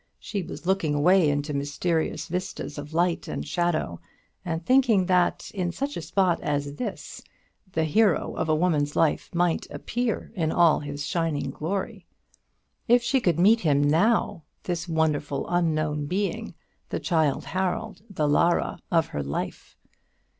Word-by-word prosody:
She 200 - -4
was 160 -2 -8
looking 180 -5 +1
away 175 +2 +4
into 145 +1 -1
mysterious 145 +4 -1
vistas 180 -4 -4
of 145 +1 -8
light 170 +1 0
and - - -4
shadow, 175 - -1 0.4
and 165 -1 -3
thinking 245 -7 +4
that 180 -1 +1
in 180 -4 -1
such 275 +9 -3
a - - -4
spot 175 +2 +1
as 145 0 -2
this 215 -5 -6 0.5
the 160 - +1
hero 195 +4 +2
of 160 - -2
a 155 - +4
woman's 155 -3 +1
life 160 -2 +1
might 175 -1 0
appear 230 +11 -3
in 165 -7 -1
all 170 -3 +4
his 145 0 -5
shining 160 -5 -1
glory. 185 +7 -4 0.8
If 240 0 +5
she 265 +2 +2
could 175 -7 +2
meet 215 +6 +6
him 145 -7 +2
now, 200 +5 +2 0.2
this 175 -1 -3
wonderful 155 -4 0
unknown 155 -4 0
being 195 +5 -2 0.3
the - - -2
Childe 160 -5 +1
Harold, 185 0 -2
the 155 -7 -1
Lara, 170 +4 +2
of 165 -2 +3
her 75 - -3
life! 70 0 -5
165 Hz, 150 wpm, -26 LUFS, 150-185 Hz, 0.8 s, meet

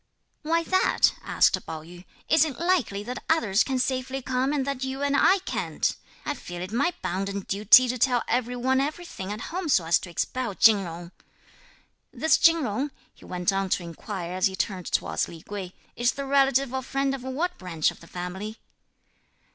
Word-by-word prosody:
"Why 330 +2 +1
that?" 375 +3 +3
asked - - +2
Pao 155 -1 -6
yü. 175 +2 -13 0.2
"Is 315 -1 +5
it 300 -5 -3
likely 330 - +1
that 250 +3 -6
others 230 -11 +3
can 265 -2 -2
safely 260 +1 -1
come 260 +1 -1
and 285 -3 0
that 275 -2 -3
you 265 +1 -3
and 285 0 +1
I 375 +6 +5
can't? - - -1 0.3
I 295 - -1
feel 175 -9 -7
it 185 - -7
my 280 +10 +1
bounden 195 +2 -2
duty 210 +7 +6
to 250 0 -2
tell 245 -1 +2
every 245 +1 0
one 260 +2 +1
everything 290 - -5
at 215 +7 -6
home 360 -2 -2
so 185 - +3
as 165 +1 +3
to - - -9
expel 235 +5 -2
Chin 220 0 +6
Jung. 170 -1 -7 1.0
This 315 - +2
Chin 330 -1 +5
Jung," 255 +5 -1 0.2
he - - -18
went 180 +1 -1
on 195 0 -1
to 180 - 0
inquire 175 +1 -6
as 185 +1 +2
he 190 - -5
turned 190 -2 -3
towards - - 0
Lei 165 -1 -11
Kuei, 195 -3 -6 0.2
"is 240 0 +1
the 280 - -5
relative 270 -1 +2
or 265 - -1
friend 275 +1 -1
of 270 - -5
what 305 +8 -3
branch 165 -4 0
of - - -15
the 170 - -15
family?" 190 +6 -6
245 Hz, 195 wpm, -26 LUFS, 190-275 Hz, 1.0 s, duty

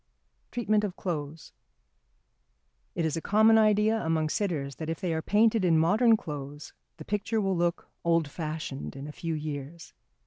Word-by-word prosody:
[Sidenote: - - -44
Treatment 215 -3 +1
of 195 -3 -3
Clothes.] 155 -3 -5 1.4
It 165 - 0
is 160 0 0
a 165 - -3
common 220 +4 +5
idea 215 +1 +3
among 160 -1 0
sitters 150 - -2
that 160 - -5
if 165 - -3
they 175 -3 -1
are 160 - -1
painted 215 +3 +3
in 170 -3 +4
modern 215 +8 +4
clothes 145 -3 -7 0.2
the - - -10
picture 210 +2 -1
will 195 -2 0
look 170 0 -1 0.2
old 165 -2 +2
fashioned 155 -3 -5
in 135 +1 -7
a - - -6
few 165 +1 -4
years. 150 +2 -6
165 Hz, 170 wpm, -28 LUFS, 155-210 Hz, 1.4 s, common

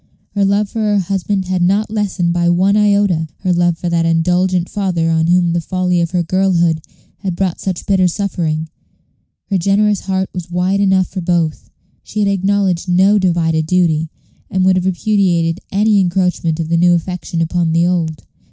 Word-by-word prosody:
Her 205 - 0
love 200 +1 +1
for 225 - -6
her 210 -1 +1
husband 195 +1 -1
had 185 -1 -1
not 200 +4 +1
lessened 195 -5 -1
by 175 0 +1
one 190 +3 +2
iota 200 -6 +2
her 185 -2 +1
love 175 -1 +1
for 175 - -5
that 170 -1 +1
indulgent 180 +2 +1
father 175 -5 -1
on 160 0 +1
whom 175 -1 +2
the 170 - 0
folly 180 0 0
of 170 - -1
her 180 -1 -1
girlhood 170 -3 +1 0.4
had 190 -3 -3
brought 185 -1 -2
such 185 -3 -4
bitter 190 -3 +2
suffering. 170 -5 -2 0.8
Her 195 - +2
generous 200 +2 +2
heart 190 0 -1
was 180 -2 -6
wide 180 +3 0
enough 190 -2 +3
for 190 - -5
both. 170 -3 -1 0.3
She - - -11
had 205 -1 +2
acknowledged 195 -2 0
no 190 +4 +4
"divided 165 -4 0
duty," 160 -3 +1 0.4
and 185 -1 0
would 190 0 +4
have 185 0 0
repudiated 180 -3 +1
any 210 +1 +2
encroachment 180 -3 0
of 160 -1 -3
the 170 - +2
new 175 +1 +4
affection 175 0 -4
upon 165 0 0
the 165 +1 +2
old. 165 -3 -1
180 Hz, 180 wpm, -16 LUFS, 170-195 Hz, 0.8 s, no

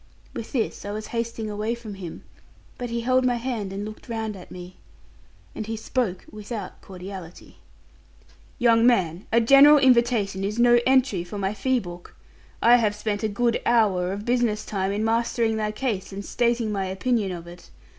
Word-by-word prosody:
With 230 -2 -7
this 235 -5 -2
I 205 - -6
was 215 +1 -5
hasting 230 -1 -3
away 215 +2 -2
from 230 -3 -9
him, 185 -4 -8 0.6
but 245 -1 -4
he 235 0 -2
held 255 +2 +2
my 250 -1 +2
hand 235 -5 -3
and 200 +1 -4
looked 215 +3 -10
round 220 -2 -3
at 185 - -12
me. 180 0 -10 0.8
And 215 - -6
he 225 0 -3
spoke 220 -4 -2
without 210 -2 -7
cordiality. 185 -2 -10 1.0
'Young 235 -2 +4
man, 185 -7 +1
a 230 - +5
general 275 +5 +7
invitation 235 -7 +3
is 205 +3 -2
no 240 0 +5
entry 260 -8 +3
for 190 +4 -8
my 195 0 -1
fee 255 +5 +1
book. 175 -3 -10 0.5
I 240 +1 +7
have 215 -3 +1
spent 210 -1 -3
a 220 - +1
good 235 +3 0
hour 200 -6 +2
of 200 +2 -5
business 240 -3 0
time 195 -2 -2
in 210 +2 -1
mastering 230 0 +1
thy 215 -1 -1
case, 210 -4 -3
and 195 +1 -6
stating 235 -2 0
my 195 -2 -1
opinion 195 +2 -1
of 170 -2 -7
it. 175 +1 -13
215 Hz, 180 wpm, -24 LUFS, 195-235 Hz, 1.0 s, general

